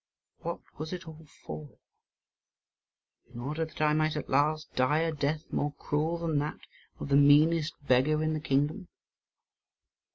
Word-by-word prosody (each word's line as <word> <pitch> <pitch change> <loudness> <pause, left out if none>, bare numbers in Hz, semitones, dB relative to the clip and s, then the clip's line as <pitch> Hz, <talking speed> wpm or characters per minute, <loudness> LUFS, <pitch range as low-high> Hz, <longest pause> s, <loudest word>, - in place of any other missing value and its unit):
What - - -5 0.2
was 155 +3 -4
it 180 -2 -7
all 160 0 -11 0.2
for? 75 -1 -7 1.6
In 120 - -9
order 150 +6 -2
that 155 - -9
I 150 0 +4
might 155 0 +1
at 150 - -5
last 155 +3 +1
die 130 +5 +2
a 165 0 0
death 150 +1 -1
more 145 0 -1
cruel 155 +3 -1
than 165 -3 0
that 150 +1 -3 0.4
of - - -5
the 140 - +4
meanest 150 +3 +5
beggar 145 +4 +3
in 155 0 0
the 155 - -1
kingdom? 150 +6 0
155 Hz, 155 wpm, -29 LUFS, 145-160 Hz, 1.6 s, meanest